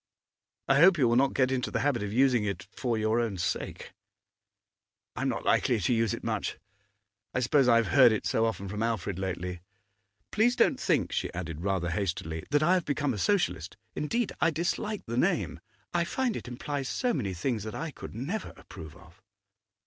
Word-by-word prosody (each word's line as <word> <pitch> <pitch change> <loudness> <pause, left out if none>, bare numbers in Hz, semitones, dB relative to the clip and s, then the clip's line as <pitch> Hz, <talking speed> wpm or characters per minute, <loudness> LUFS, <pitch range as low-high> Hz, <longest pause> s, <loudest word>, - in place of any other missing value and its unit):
I 135 - +4
hope 175 +2 +7
you 130 -5 +4
will 120 - +3
not 135 +2 +3
get 130 -1 +2
into 130 -1 -1
the - - -1
habit 140 -5 +1
of 105 -1 -3
using 125 -1 +3
it 100 -1 -3
for 120 -3 -1
your 110 +2 +1
own 115 -5 -1
sake.' 85 - -3 1.2
'I - - -4
am - - +1
not - - -3
likely 120 -3 +2
to 105 +6 +1
use 115 -2 +1
it - - -11
much. - - -2 0.8
I - - +2
suppose 125 +2 +3
I 120 - +6
have 115 -3 +2
heard 130 -4 +7
it 110 - -1
so 115 0 +2
often 100 -3 -4
from 105 +3 -4
Alfred 110 -5 -1
lately. 90 -2 -4 0.7
Please 235 +4 +3
don't - - +3
think,' - - +1
she - - -2
added 80 -1 -5
rather 95 -2 -1
hastily, 85 -4 -3
'that 145 +1 +2
I 175 +4 +4
have 180 -2 +1
become 145 -2 0
a 105 - -5
Socialist. 95 - 0 0.2
Indeed, 230 +9 -1
I 165 - +5
dislike 175 +6 -2
the 115 +1 -4
name; - - +1 0.3
I 175 -1 +2
find 240 +6 -1
it - - -6
implies 135 +2 -4
so 245 - 0
many 100 - -2
things 110 +6 -1
that 110 +1 -6
I 165 0 -4
could 125 - -10
never 150 - -4
approve 80 -1 -11
of. 85 0 -19
120 Hz, 200 wpm, -29 LUFS, 100-145 Hz, 1.2 s, hope